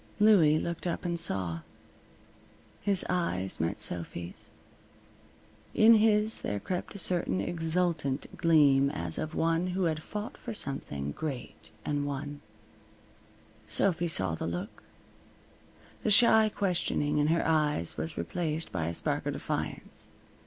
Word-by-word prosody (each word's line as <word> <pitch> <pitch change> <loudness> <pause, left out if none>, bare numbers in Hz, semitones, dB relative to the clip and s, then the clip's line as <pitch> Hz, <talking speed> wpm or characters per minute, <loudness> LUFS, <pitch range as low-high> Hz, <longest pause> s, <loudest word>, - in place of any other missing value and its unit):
Louie 190 -8 +6
looked 170 +2 -3
up 170 - -3
and 170 -1 -1
saw. 90 - -2 1.2
His 200 -3 +1
eyes 95 - -1
met 80 +1 -1
Sophy's. 85 0 -4 1.3
In 225 +1 +7
his 215 0 +3
there 100 0 -2
crept 180 - -4
a - - -4
certain 175 - 0
exultant 165 - -1
gleam, 140 -4 +4
as 85 -8 -3
of 155 +1 -4
one 165 +2 +1
who 190 - +1
had 160 -2 0
fought 210 +5 -6
for 235 - -6
something 70 - -4
great 140 - -6 0.2
and 145 -1 -1
won. 145 +1 -5 1.3
Sophy 170 - +2
saw 95 - +1
the 80 - -3
look. 85 +1 -5 1.2
The - - 0
shy 220 0 +6
questioning 170 -7 0
in 145 - +3
her 165 +1 +2
eyes 150 - +1
was 80 +1 -5
replaced 160 - -3
by 85 -3 -2
a 85 - -2
spark - - -1
of - - -1
defiance. - - -5
155 Hz, 130 wpm, -30 LUFS, -, 1.3 s, In